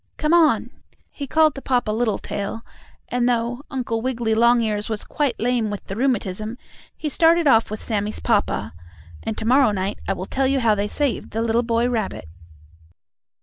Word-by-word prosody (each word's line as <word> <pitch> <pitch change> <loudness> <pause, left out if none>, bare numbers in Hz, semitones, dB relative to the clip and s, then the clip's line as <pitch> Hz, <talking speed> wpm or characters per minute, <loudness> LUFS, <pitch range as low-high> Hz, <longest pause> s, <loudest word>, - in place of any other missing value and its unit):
Come 305 +1 +1
on!" 335 -3 +4 0.4
he 280 - -6
called 315 +2 +4
to 275 - -8
Papa 245 -5 0
Littletail, 220 -1 -2 0.4
and, 245 0 +1
though 240 +1 -1
Uncle 245 -5 -2
Wiggily 235 -3 -1
Longears 225 -2 +2
was 215 -2 -2
quite 285 -5 -1
lame 240 -2 +1
with 205 -1 -5
the 195 - -6
rheumatism, 220 -3 -1 0.4
he 310 - -4
started 330 +2 +3
off 225 -4 +4
with 215 0 -6
Sammie's 210 -1 -2
papa, 205 - 0 0.5
and 220 - -4
to 220 - -3
morrow 260 +1 +5
night 195 -1 -2
I - - +1
will 185 - -5
tell 265 +6 0
you 270 0 +2
how 230 -3 +3
they 205 0 -1
saved 280 +3 -1
the 225 +1 -2
little 230 +1 +2
boy 235 0 +1
rabbit. 220 - -2
235 Hz, 175 wpm, -22 LUFS, 215-260 Hz, 0.5 s, morrow